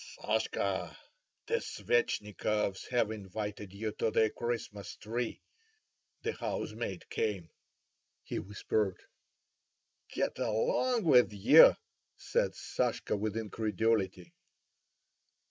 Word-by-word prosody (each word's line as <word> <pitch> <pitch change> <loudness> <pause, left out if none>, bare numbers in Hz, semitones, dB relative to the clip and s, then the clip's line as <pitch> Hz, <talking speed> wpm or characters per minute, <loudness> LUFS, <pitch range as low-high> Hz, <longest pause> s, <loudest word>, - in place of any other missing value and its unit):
"Sashka! - - -1 0.5
the 465 +1 +1
Svetchnikovs 105 - -1
have 120 -3 +1
invited 105 -1 -5
you 105 +2 -3
to 115 - +2
the 110 0 +3
Christmas 115 -4 -4
tree. 115 +2 -4 0.8
The 450 - -1
housemaid 110 -4 -4
came," 95 -7 -2 0.7
he - - -3
whispered. 100 -1 -1 1.1
"Get - - -2
along 225 - +1
with 125 -9 +6
you!" 100 -2 +8 0.4
said - - 0
Sashka - - -1
with 105 +1 -2
incredulity. 105 -3 -1
110 Hz, 90 wpm, -32 LUFS, 100-115 Hz, 1.1 s, you